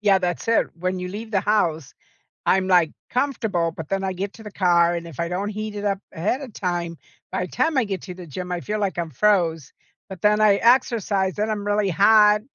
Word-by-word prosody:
Yeah, 200 -2 +4
that's 180 -2 -3
it. 230 - +3
When 185 +2 -2
you 180 0 -4
leave 215 +4 -7
the 200 -3 +1
house, 170 -9 0 0.5
I'm, 190 0 +2
like, 175 -4 +4 0.2
comfortable, 220 -11 0
but 160 -2 -9
then 195 0 -1
I 190 -1 -1
get 195 +3 -4
to 225 - -13
the 210 - -9
car, 175 -3 +3
and 170 0 -5
if 165 -3 -12
I 170 - 0
don't 190 +4 -2
heat 215 0 -5
it 205 - -5
up 195 -1 0
ahead 195 - -1
of 255 -6 -9
time, 175 -3 -3 0.3
by - - -1
the - - -13
time 320 -3 +1
I 260 - +4
get 195 -4 -4
to 185 - -7
the 180 0 -10
gym, 180 +5 -6
I 175 -1 -2
feel 215 +3 -3
like 200 -3 -1
I'm 170 -2 -3
froze. 165 -3 +1 0.4
But 190 - -9
then 210 0 +3
I 210 -2 +6
exercise, 210 -5 +2
then 215 +1 -1
I'm 205 -1 -3
really 205 -1 +1
hot, 210 +3 +5
195 Hz, 235 wpm, -23 LUFS, 175-210 Hz, 0.5 s, I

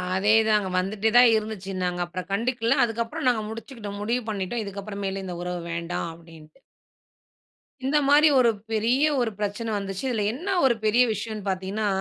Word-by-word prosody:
அதேதாங்க. 210 +1 +3
வந்துட்டேதான் 215 +6 +4
இருந்துச்சு. 210 -3 -3
நாங்க 180 0 -1
அப்பறம் 180 +1 -7
கண்டுக்கல. 235 +4 +1
அதுக்கப்பறம் 230 +2 -2
நாங்க 225 -3 0
முடிச்சுக்கிட்டோம். 220 -2 -7
முடிவு 235 +3 -1
பண்ணிட்டோம். 210 +2 -2
இதுக்கப்பறமேல 200 -1 -5
இந்த 180 -2 -5
உறவு 180 0 -4
வேண்டாம் 170 0 -3
அப்டின்டு. 165 +4 -16 1.3
இந்த 290 +3 +2
மாரி 295 +2 +6
ஒரு 245 -2 +5 0.2
பெரிய 230 +6 +2 0.2
ஒரு 230 -2 0
பிரச்சன 210 +2 -2
வந்துச்சு. 195 +2 -5
இதுல 225 -4 0
என்ன 320 +10 -8 0.2
ஒரு 250 -3 +4
பெரிய 235 +4 +5
விஷயம்னு 215 -1 -5
பாத்தீங்கன்னா 190 +3 -2
215 Hz, 145 wpm, -25 LUFS, 190-230 Hz, 1.3 s, மாரி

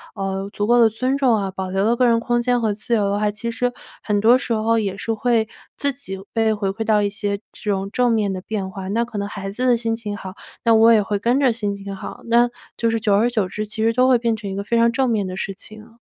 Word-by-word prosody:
呃， 195 0 -3
足 205 - -1
够 240 0 +5
的 225 - +6
尊 255 +5 -1
重 255 -5 +3
啊， 195 -2 -2
保 190 0 -5
留 195 +1 +1
了 235 +2 +3
个 250 -1 +4
人 230 -1 +4
空 240 +1 +1
间 245 0 +1
和 215 -2 +1
自 220 +3 -4
由 200 -2 +1
的 205 +1 0
话， 210 0 +1
其 235 +3 -5
实 245 +2 -1 0.3
很 205 -1 +1
多 235 +3 +6
时 245 - -2
候 225 +1 +1
也 195 -2 -2
是 225 - -2
会 225 0 +1 0.3
自 280 - 0
己 195 -8 -8
被 225 -1 +2
回 205 -2 -2
馈 220 +3 -3
到 210 -1 +3
一 205 - +1
些 200 0 -2
这 210 - -4
种 195 0 -2
正 245 0 +2
面 210 -3 +1
的 185 - -4
变 195 -1 -4
化。 190 -1 -7
那 230 +4 +1
可 230 -3 -8
能 200 - -2
孩 195 -1 -6
子 250 +6 -3
的 245 - +5
心 225 -1 -1
情 210 -3 -5
好， 190 0 -8 0.3
那 230 -1 +4
我 225 +1 +6
也 215 - +5
会 205 0 -1
跟 240 +5 +2
着 265 -3 +4
心 205 -3 -3
情 200 0 -7
好， - - -8
那 235 +1 +4 0.3
就 230 - 0
是 225 - 0
久 210 -2 +2
而 220 +4 +3
久 215 -6 0
之， 210 +3 -4
其 220 +1 -4
实 225 - +3
都 255 +1 +3
会 250 - +6
变 230 -1 0
成 205 -2 -6
一 190 - -4
个 200 - -3
非 235 +3 0
常 230 0 +4
正 255 +1 +1
面 215 -4 0
的 185 - -5
事 195 - -4
情 215 +1 -13
啊。 230 - -18
220 Hz, 315 characters per minute, -21 LUFS, 200-235 Hz, 0.3 s, 的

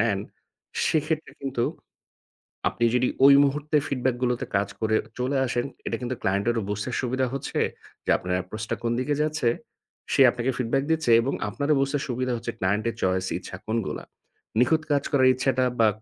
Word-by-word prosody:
নেন 110 -4 +2 0.7
সেক্ষেত্রে 155 0 0
কিন্তু 135 -3 -1 1.0
আপনি 120 - -2
যদি 125 0 +3 0.2
ওই 140 0 +9
মুহূর্তে 150 +2 0
ফিডব্যাকগুলোতে 125 -2 0
কাজ 100 0 +1
করে 110 0 +2 0.2
চলে 130 +3 0
আসেন 120 0 -1 0.2
এটা - - -1
কিন্তু 125 0 -2
ক্লায়েন্টেরও 100 +4 +1
বুঝতে 105 +5 -2
সুবিধা 130 +1 0
হচ্ছে 135 - -3 0.5
যে, - - 0
আপনার 90 0 -3
এপ্রোচটা 110 +4 -4
কোন 115 0 0
দিকে 145 +3 0
যাচ্ছে। 155 -5 0 0.6
সে - - +2
আপনাকে 120 +2 -1
ফিডব্যাক 130 +3 0
দিচ্ছে 160 -6 +1
এবং 130 +4 -1 0.2
আপনারও 140 +8 +1
বুঝতে 140 +1 +1
সুবিধা 125 +1 -1
হচ্ছে 115 0 -4
ক্লায়েন্টের 105 +5 0
চয়েস, 95 0 +1
ইচ্ছা - - -8
কোনগুলা। 110 -2 -2 0.5
নিখুঁত 155 +6 +3
কাজ 140 -1 +3
করার 130 -2 +5
ইচ্ছাটা 130 0 +1 0.2
বা 110 - +6
125 Hz, 155 wpm, -25 LUFS, 115-135 Hz, 1.0 s, ওই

